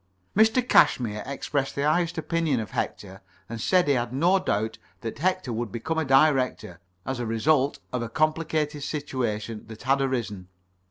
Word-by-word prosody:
Mr. 220 Hz, +4 st, +4 dB
Cashmere 105 Hz, -, +4 dB
expressed 140 Hz, 0 st, -2 dB
the 140 Hz, -, -1 dB
highest 165 Hz, +3 st, +1 dB
opinion 160 Hz, -5 st, 0 dB
of 110 Hz, -, -5 dB
Hector, 95 Hz, 0 st, -4 dB, 0.3 s
and 115 Hz, +1 st, -6 dB
said 180 Hz, +4 st, +3 dB
he 145 Hz, -, +4 dB
had 120 Hz, -2 st, -1 dB
no 175 Hz, +9 st, +3 dB
doubt 110 Hz, -, -2 dB, 0.2 s
that 115 Hz, +1 st, -6 dB
Hector 185 Hz, -6 st, 0 dB
would 115 Hz, -1 st, -3 dB
become 160 Hz, +8 st, -2 dB
a 160 Hz, -, 0 dB
Director, 135 Hz, -, +2 dB, 0.3 s
as 130 Hz, -1 st, -3 dB
a 120 Hz, -, -2 dB
result 135 Hz, +5 st, +2 dB, 0.2 s
of 125 Hz, -, -1 dB
a 115 Hz, -, -4 dB
complicated 155 Hz, +1 st, 0 dB
situation 120 Hz, -8 st, -3 dB
that 110 Hz, 0 st, -10 dB
had 135 Hz, +2 st, +2 dB
arisen. 115 Hz, -8 st, -2 dB
135 Hz, 165 wpm, -26 LUFS, 115-155 Hz, 0.3 s, Mr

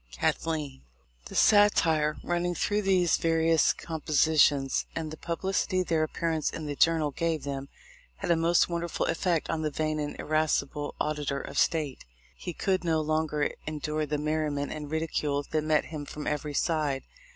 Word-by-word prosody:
Cathleen. 145 Hz, -, -2 dB, 0.4 s
The -, -, -9 dB
satire 165 Hz, -8 st, +4 dB
running 175 Hz, 0 st, -1 dB
through 205 Hz, +5 st, 0 dB
these 185 Hz, -4 st, +3 dB
various 165 Hz, -1 st, +3 dB
com 160 Hz, -2 st, -6 dB
positions, 145 Hz, -3 st, +3 dB
and 160 Hz, -2 st, -3 dB
the -, -, -6 dB
publicity 185 Hz, +3 st, -1 dB
their 165 Hz, -3 st, +1 dB
appearance 160 Hz, 0 st, -1 dB
in 155 Hz, -, -6 dB
the 145 Hz, -1 st, -3 dB
Journal 160 Hz, -1 st, +3 dB
gave 165 Hz, +1 st, -1 dB
them, 140 Hz, -1 st, -5 dB, 0.5 s
had 170 Hz, -, -2 dB
a -, -, +5 dB
most 165 Hz, +1 st, +3 dB
wonderful 170 Hz, -1 st, -2 dB
effect 170 Hz, -2 st, 0 dB
on 160 Hz, -1 st, -1 dB
the 155 Hz, -, 0 dB
vain 155 Hz, +1 st, -1 dB
and 145 Hz, -1 st, -4 dB
irascible 150 Hz, -1 st, 0 dB
Auditor 150 Hz, -2 st, -1 dB
of -, -, -3 dB
State. 150 Hz, -5 st, 0 dB, 0.3 s
He 175 Hz, -, -6 dB
could 185 Hz, +2 st, 0 dB
no 165 Hz, -2 st, +1 dB
longer 155 Hz, -1 st, 0 dB, 0.2 s
endure 155 Hz, 0 st, -2 dB
the 150 Hz, +1 st, -1 dB
merriment 150 Hz, -1 st, -1 dB
and 150 Hz, -1 st, -6 dB
ridicule 150 Hz, -2 st, -1 dB
that 155 Hz, -1 st, +1 dB
met 155 Hz, -1 st, +2 dB
him 150 Hz, -2 st, -4 dB
from 150 Hz, -, -7 dB
every 150 Hz, 0 st, -2 dB
side. 150 Hz, -4 st, 0 dB
155 Hz, 160 wpm, -28 LUFS, 150-165 Hz, 0.5 s, a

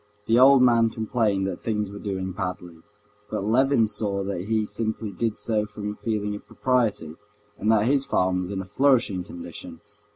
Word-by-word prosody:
The 115 Hz, +2 st, +3 dB
old 135 Hz, 0 st, +7 dB
man 115 Hz, -2 st, +4 dB
complained 110 Hz, -3 st, 0 dB
that 95 Hz, -2 st, -4 dB
things 105 Hz, -3 st, -2 dB
were 100 Hz, -, -8 dB
doing 95 Hz, -2 st, -3 dB
badly. 90 Hz, -3 st, -5 dB, 0.5 s
But 100 Hz, -, -3 dB
Levin 125 Hz, +2 st, +3 dB
saw 105 Hz, -2 st, -2 dB
that 95 Hz, -2 st, -4 dB
he 110 Hz, 0 st, 0 dB
simply 110 Hz, -1 st, -3 dB
did 110 Hz, +3 st, -2 dB
so 105 Hz, -2 st, -1 dB
from 105 Hz, 0 st, -5 dB
a -, -, -8 dB
feeling 105 Hz, -2 st, -2 dB
of 105 Hz, -, -9 dB
propriety, 115 Hz, -11 st, 0 dB, 0.5 s
and 110 Hz, -, +2 dB
that 110 Hz, -1 st, +3 dB
his 135 Hz, +2 st, +2 dB
farm 90 Hz, -7 st, +1 dB
was 90 Hz, 0 st, -4 dB
in 100 Hz, -1 st, -3 dB
a -, -, -8 dB
flourishing 115 Hz, -3 st, +2 dB
condition. 85 Hz, -1 st, -9 dB
105 Hz, 185 wpm, -25 LUFS, 95-115 Hz, 0.5 s, old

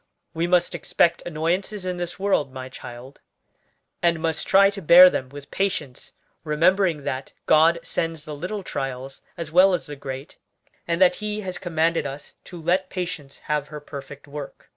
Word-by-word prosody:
We 165 Hz, +1 st, -1 dB
must 175 Hz, -1 st, +2 dB
expect 170 Hz, -, +1 dB
annoyances 180 Hz, +5 st, -2 dB
in 180 Hz, -1 st, -2 dB
this 175 Hz, -1 st, -5 dB
world, 190 Hz, -8 st, +1 dB
my 130 Hz, -1 st, -7 dB
child; 125 Hz, +1 st, -11 dB, 0.8 s
and 170 Hz, -1 st, +2 dB
must 160 Hz, -1 st, -1 dB
try 195 Hz, +1 st, +6 dB
to 200 Hz, -1 st, -7 dB
bear 180 Hz, +2 st, +9 dB
them 130 Hz, -, -3 dB
with 145 Hz, +1 st, -11 dB
patience, 150 Hz, -9 st, -3 dB, 0.3 s
remembering 165 Hz, +1 st, +2 dB
that 135 Hz, -1 st, -4 dB
God 160 Hz, +2 st, +5 dB
sends 165 Hz, -2 st, -3 dB
the 150 Hz, -, -6 dB
little 190 Hz, +7 st, -5 dB
trials 135 Hz, -3 st, -5 dB, 0.2 s
as 165 Hz, -2 st, -6 dB
well 185 Hz, +2 st, +6 dB
as 155 Hz, -7 st, -5 dB
the 145 Hz, -, -7 dB
great, 135 Hz, +1 st, -8 dB, 0.5 s
and 170 Hz, 0 st, 0 dB
that 185 Hz, -1 st, +5 dB
He 210 Hz, 0 st, -3 dB
has 185 Hz, -2 st, -5 dB
commanded 165 Hz, -2 st, 0 dB
us 140 Hz, +2 st, -9 dB
to 175 Hz, -, -9 dB
'let 185 Hz, +3 st, 0 dB
patience 175 Hz, -6 st, -5 dB
have 150 Hz, -1 st, -1 dB
her 150 Hz, 0 st, -8 dB
perfect 140 Hz, -1 st, -10 dB
work.' 145 Hz, -1 st, -9 dB
165 Hz, 170 wpm, -24 LUFS, 145-180 Hz, 0.8 s, bear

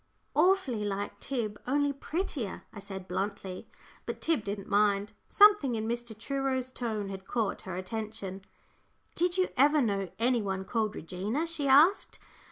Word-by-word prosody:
"Awfully 350 Hz, -, +3 dB
like 205 Hz, 0 st, -3 dB
Tib, 220 Hz, -6 st, -3 dB
only 285 Hz, +2 st, +2 dB
prettier," 280 Hz, -, -3 dB
I 210 Hz, -, -8 dB
said, 195 Hz, -2 st, -7 dB
bluntly. 195 Hz, -2 st, -4 dB, 0.4 s
But -, -, -4 dB
Tib 320 Hz, -9 st, +1 dB
didn't 200 Hz, -1 st, -4 dB
mind. 205 Hz, 0 st, +2 dB, 0.2 s
Something 410 Hz, -, +6 dB
in 220 Hz, 0 st, -2 dB
Mr. 235 Hz, -1 st, -3 dB
Truro's 260 Hz, +1 st, -2 dB
tone 220 Hz, -5 st, -3 dB
had 190 Hz, 0 st, -8 dB
caught 225 Hz, -4 st, -1 dB
her 180 Hz, -, -3 dB
attention. 195 Hz, 0 st, -5 dB, 0.7 s
"Did 355 Hz, +2 st, +1 dB
you 370 Hz, -, +2 dB
ever 295 Hz, +4 st, +5 dB
know 200 Hz, -7 st, 0 dB
any 240 Hz, +1 st, +2 dB
one 190 Hz, -2 st, -3 dB
called 220 Hz, 0 st, -1 dB
Regina?" 200 Hz, -, -2 dB
she 325 Hz, -4 st, -1 dB
asked. 300 Hz, +9 st, +5 dB
225 Hz, 150 wpm, -30 LUFS, 200-275 Hz, 0.7 s, Something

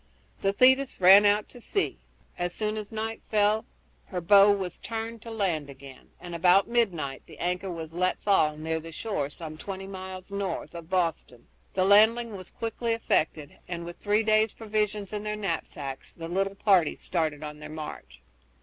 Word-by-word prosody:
The 195 Hz, -, +2 dB
Thetis 260 Hz, +5 st, +4 dB
ran 195 Hz, +3 st, +8 dB
out 205 Hz, +1 st, +2 dB
to 245 Hz, -, -13 dB
sea. 395 Hz, -, -1 dB, 0.4 s
As 175 Hz, 0 st, -3 dB
soon 215 Hz, 0 st, -1 dB
as 215 Hz, -1 st, -6 dB
night 225 Hz, 0 st, -4 dB
fell 210 Hz, 0 st, +2 dB, 0.4 s
her 180 Hz, -, -3 dB
bow 200 Hz, +3 st, +7 dB
was 190 Hz, -3 st, -2 dB
turned 225 Hz, 0 st, -5 dB
to 230 Hz, -, -9 dB
land 180 Hz, -10 st, -1 dB
again, 135 Hz, -1 st, -13 dB
and 175 Hz, -1 st, -8 dB
about 180 Hz, +3 st, +4 dB
midnight 180 Hz, -, 0 dB
the -, -, -13 dB
anchor 180 Hz, +2 st, -2 dB
was 165 Hz, -2 st, -6 dB
let 180 Hz, +2 st, 0 dB
fall 155 Hz, -7 st, +3 dB
near 160 Hz, +1 st, -2 dB
the 165 Hz, +1 st, -10 dB
shore 160 Hz, -6 st, -3 dB
some 155 Hz, 0 st, -9 dB
twenty 195 Hz, +1 st, -6 dB
miles 190 Hz, -1 st, -8 dB
north 200 Hz, -1 st, -3 dB
of 170 Hz, -1 st, -9 dB
Boston. 165 Hz, -9 st, -2 dB, 0.3 s
The 185 Hz, -1 st, +2 dB
landing 220 Hz, +3 st, +5 dB
was 185 Hz, -2 st, -9 dB
quickly 230 Hz, +1 st, -2 dB
effected, 155 Hz, -9 st, -1 dB
and 170 Hz, -1 st, -5 dB
with 175 Hz, 0 st, -8 dB
three 210 Hz, +2 st, +2 dB
days' 215 Hz, 0 st, +3 dB
provisions 210 Hz, -2 st, -2 dB
in 210 Hz, -, -2 dB
their 210 Hz, 0 st, -3 dB
knapsacks 160 Hz, -8 st, -4 dB
the 165 Hz, -1 st, -7 dB
little 195 Hz, +3 st, -1 dB
party 190 Hz, -6 st, +3 dB
started 155 Hz, -4 st, -2 dB
on 150 Hz, 0 st, -7 dB
their 150 Hz, -, -9 dB
march. 150 Hz, -, -8 dB
190 Hz, 175 wpm, -27 LUFS, 165-215 Hz, 0.4 s, ran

